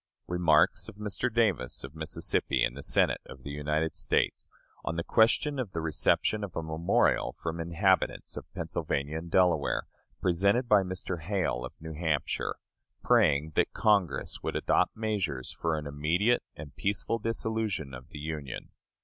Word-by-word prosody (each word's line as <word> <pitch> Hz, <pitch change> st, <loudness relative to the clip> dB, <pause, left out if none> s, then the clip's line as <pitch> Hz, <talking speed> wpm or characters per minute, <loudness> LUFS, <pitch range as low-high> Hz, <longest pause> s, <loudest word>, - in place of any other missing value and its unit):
Remarks 85 Hz, -3 st, +3 dB
of -, -, -12 dB
Mr. 105 Hz, +4 st, -2 dB
Davis, 105 Hz, -, +1 dB
of 65 Hz, +1 st, -8 dB
Mississippi, 80 Hz, 0 st, -1 dB
in -, -, +1 dB
the 70 Hz, -, -8 dB
Senate -, -, +2 dB
of 65 Hz, -1 st, -12 dB
the 70 Hz, -, -6 dB
United 75 Hz, +2 st, -1 dB
States, -, -, 0 dB, 0.3 s
on 85 Hz, -, -2 dB
the 85 Hz, -, -1 dB
question 125 Hz, -, +3 dB
of 115 Hz, -7 st, -3 dB
the 85 Hz, -, -2 dB
reception 80 Hz, +6 st, +1 dB
of 100 Hz, -4 st, -6 dB
a 80 Hz, -, -2 dB
memorial 80 Hz, +1 st, +2 dB
from 80 Hz, 0 st, -5 dB
inhabitants 85 Hz, +3 st, +1 dB
of -, -, -8 dB
Pennsylvania 70 Hz, +3 st, -2 dB
and 85 Hz, +1 st, -9 dB
Delaware, 90 Hz, 0 st, +3 dB, 0.4 s
presented 100 Hz, +8 st, +2 dB
by 105 Hz, -3 st, +6 dB
Mr. 90 Hz, -2 st, -4 dB
Hale, 85 Hz, -9 st, -1 dB
of 65 Hz, -, -6 dB
New 80 Hz, 0 st, -7 dB
Hampshire, 80 Hz, -2 st, -1 dB, 0.5 s
praying 75 Hz, +3 st, +4 dB
that -, -, +1 dB
Congress 100 Hz, -10 st, +1 dB
would -, -, -3 dB
adopt -, -, +2 dB
measures 95 Hz, -, -1 dB
for 80 Hz, -1 st, -1 dB
an 75 Hz, -, -5 dB
immediate 80 Hz, +11 st, +2 dB
and 75 Hz, -2 st, -10 dB
peaceful 105 Hz, +3 st, -1 dB
dissolution 110 Hz, -, -2 dB
of 65 Hz, 0 st, -10 dB
the -, -, -9 dB
Union. 75 Hz, -3 st, -5 dB
85 Hz, 160 wpm, -29 LUFS, 75-100 Hz, 0.5 s, by